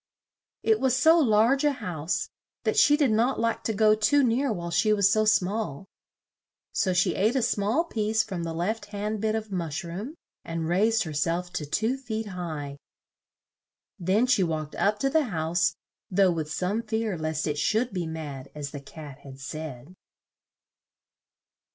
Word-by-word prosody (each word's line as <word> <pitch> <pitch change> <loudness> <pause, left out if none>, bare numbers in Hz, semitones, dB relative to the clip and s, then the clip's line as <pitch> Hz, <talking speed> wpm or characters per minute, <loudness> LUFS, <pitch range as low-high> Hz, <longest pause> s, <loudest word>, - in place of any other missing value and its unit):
It 440 -1 +3
was 260 -1 +2
so 320 +5 +6
large 240 +1 +3
a 295 -1 +3
house, 170 - -3 0.3
that - - 0
she 295 0 +5
did 285 -6 +3
not 235 +5 +2
like 230 0 0
to - - +1
go 215 +1 +4
too 275 +7 +3
near 250 +2 +1
while 170 -4 -4
she 195 +5 +2
was 200 -2 +4
so 215 0 +3
small; 205 -4 0 0.9
so 195 -2 +1
she 180 0 +2
ate 215 +6 +1
a 260 - +2
small 215 +12 +1
piece 220 -7 0
from 185 -5 -5
the 165 -1 -4
left 205 +7 -2
hand 205 +1 -4
bit 220 0 +1
of 220 -1 -4
mush 170 -2 -3
room, 195 - -6 0.3
and 165 -1 -3
raised 215 +7 +2
her 160 -4 -6
self 170 +4 -1
to 150 - -3
two 220 - 0
feet 220 -5 -4
high. 155 -6 -5 1.2
Then 190 +7 +2
she 250 -5 +3
walked 155 -3 -3
up 210 +1 +1
to 275 - +2
the 315 0 +3
house, 175 -3 0 0.3
though 190 -1 +4
with 160 -2 -3
some 190 +7 -1
fear 220 -2 -2
lest 155 -1 -2
it 150 -1 -2
should 225 +8 +1
be 175 -3 -2
mad 145 -4 -6
as 145 -2 -5
the 145 - -7
Cat 145 -1 -11
had 135 -1 -12
said. 145 +1 -7
200 Hz, 175 wpm, -26 LUFS, 160-225 Hz, 1.2 s, so